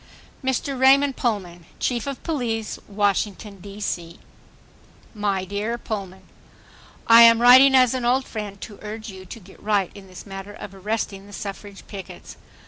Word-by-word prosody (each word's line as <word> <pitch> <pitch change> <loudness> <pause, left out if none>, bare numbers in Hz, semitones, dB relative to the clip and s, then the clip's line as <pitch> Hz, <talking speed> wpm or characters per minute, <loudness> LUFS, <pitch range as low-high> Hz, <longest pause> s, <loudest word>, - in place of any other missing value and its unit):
Mr. 265 +1 -1
Raymond 270 +1 +5
Pullman, 180 -8 -3
Chief 240 0 -1
of 275 -2 -5
Police, 235 -9 -3
Washington, 205 0 -1
D. 200 +2 -10
C. 170 -4 -4 1.0
My 200 -3 -1
dear 205 +5 -3
Pullman,— 195 -5 -6 0.8
I 230 0 +8
am 230 0 +8
writing 260 +3 +8
as 255 -2 +5
an 255 -1 -2
old 255 +2 +2
friend 205 -3 -6
to 205 - -9
urge 215 +1 -7
you 190 -1 -12
to 230 - -9
get 195 -1 -17
right 205 -3 0
in 200 -1 -13
this 185 0 -11
matter 195 0 -8
of 200 - -9
arresting 200 0 -4
the 205 - -14
suffrage 200 0 -8
pickets. 195 -2 -10
210 Hz, 155 wpm, -23 LUFS, 195-240 Hz, 1.0 s, I